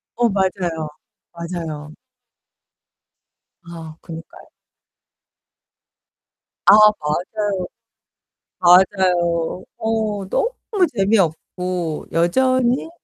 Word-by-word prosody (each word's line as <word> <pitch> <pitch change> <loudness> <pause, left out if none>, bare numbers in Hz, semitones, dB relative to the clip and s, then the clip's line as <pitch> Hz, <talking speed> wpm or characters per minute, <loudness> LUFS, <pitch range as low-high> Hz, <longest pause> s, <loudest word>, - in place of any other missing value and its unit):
어, 240 0 +2
맞아요. 185 -5 -1 0.5
맞아요. 165 -3 -6 1.7
아, 165 -2 -10
그러니까요. 165 -1 -11 2.2
아, - - +8
맞아요. 205 0 +2 0.9
맞아요. 180 -2 +3
어, 220 -3 -2
너무 485 - 0 0.4
재미없고 180 -4 -1
여전히 255 - +1
180 Hz, 140 characters per minute, -20 LUFS, 170-210 Hz, 2.2 s, 아